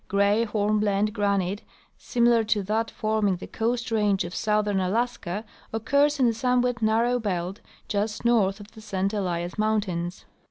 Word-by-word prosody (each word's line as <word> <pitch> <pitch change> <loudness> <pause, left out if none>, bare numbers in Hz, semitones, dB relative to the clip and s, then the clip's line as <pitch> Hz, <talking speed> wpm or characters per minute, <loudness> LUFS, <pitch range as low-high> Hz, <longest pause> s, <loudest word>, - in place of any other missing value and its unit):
Gray 200 +3 +2
hornblende 210 -1 +1
granite 200 -2 0 0.3
similar 235 -2 +2
to 210 -2 +1
that 220 +3 -1
forming 215 -3 0
the 180 - -8
Coast 235 +1 -2
range 210 -3 +2
of 175 - -7
southern 210 -1 +1
Alaska 205 0 -2 0.3
occurs 280 +7 +2
in 260 - +4
a - - 0
somewhat 245 0 +1
narrow 230 +3 +2
belt 185 -3 -3 0.3
just 210 +2 -2
north 215 -4 +3
of 205 +1 -12
the 220 - -13
St 195 -1 -2
Elias 180 -2 -2
mountains. 195 -5 -1
210 Hz, 150 wpm, -26 LUFS, 195-225 Hz, 0.3 s, in